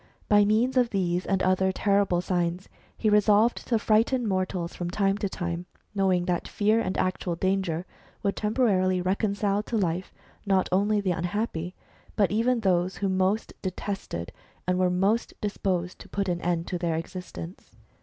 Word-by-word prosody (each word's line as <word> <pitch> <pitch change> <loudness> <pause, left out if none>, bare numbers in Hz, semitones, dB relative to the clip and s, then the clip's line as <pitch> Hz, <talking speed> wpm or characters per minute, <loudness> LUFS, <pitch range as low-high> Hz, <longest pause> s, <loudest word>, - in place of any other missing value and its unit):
By 205 -1 +5
means 235 +5 +2
of 245 -2 +4
these 180 -3 -1
and 195 -1 +1
other 185 +1 +3
terrible 200 -2 +2
signs, 180 0 -1 0.3
he 220 - 0
resolved 210 +2 +4
to 240 - +2
fris^hten 225 +4 +2
mortals 185 -4 -1
from 175 -1 -4
time 195 +1 +1
to 200 - -1
time, 175 -1 -4 0.3
knowinfr 190 -3 +2
that 175 -1 -1
fear 215 +2 +2
and 185 -5 -2
actual 185 -1 -1
danger 185 -2 0 0.4
would 200 -1 0
temporarily 205 -5 +2
reconcile 200 +2 0
to 225 +2 -3
life, 180 -2 -1 0.3
not 195 -2 +2
only 205 +3 +2
the 190 -2 0
unhappy, 175 0 -2 0.4
but 200 -3 +2
even 230 +3 +2
those 185 -2 +1
who 200 - 0
most 190 +3 0
detested 185 - -4 0.3
and 180 0 +1
were 185 -1 +3
most 195 +6 +1
disposed 185 -3 -2
to - - -12
put 200 0 -2
an 175 -1 -1
end 170 -1 0
to 180 - -2
their 170 -2 0
existence. 175 +1 -7
190 Hz, 165 wpm, -27 LUFS, 180-210 Hz, 0.4 s, By